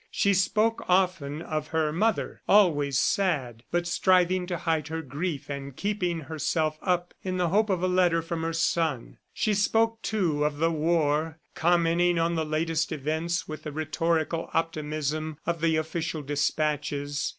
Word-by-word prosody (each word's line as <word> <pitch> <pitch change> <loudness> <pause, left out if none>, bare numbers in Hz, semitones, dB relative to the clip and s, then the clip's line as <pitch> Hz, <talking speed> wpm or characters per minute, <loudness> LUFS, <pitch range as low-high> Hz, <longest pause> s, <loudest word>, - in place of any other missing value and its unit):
She 200 - +2
spoke 215 +4 +1
often 180 -5 +1
of 155 -2 -3
her 155 -1 0
mother, 215 +6 0
always 145 -10 +4
sad, 135 - 0
but 175 0 0
striving 180 0 +2
to 175 -1 -2
hide 160 -3 -1
her 160 +1 -4
grief 145 +2 -4
and 140 -2 -6
keeping 180 -4 -1
herself 155 +1 -1
up 175 -1 0
in 185 -1 -3
the 175 -2 +1
hope 210 +4 +2
of 185 -2 0
a - - +3
letter 180 -2 +2
from 165 0 -4
her 165 0 -1
son; 165 -5 -1
she 215 - 0
spoke, 225 +3 +2
too, 170 -9 0
of 150 -1 0
the 165 +2 +2
war, 160 -1 +1 0.2
commenting 175 +1 +2
on 165 +1 +1
the 160 -1 0
latest 155 +1 -1
events 160 +4 -2
with 155 -1 -6
the 155 - -6
rhetorical 160 +2 -1
optimism 155 -1 -2
of 170 -1 -2
the 165 -1 +2
official 160 0 -2
dispatches. 145 0 -1
165 Hz, 160 wpm, -27 LUFS, 155-175 Hz, 0.2 s, always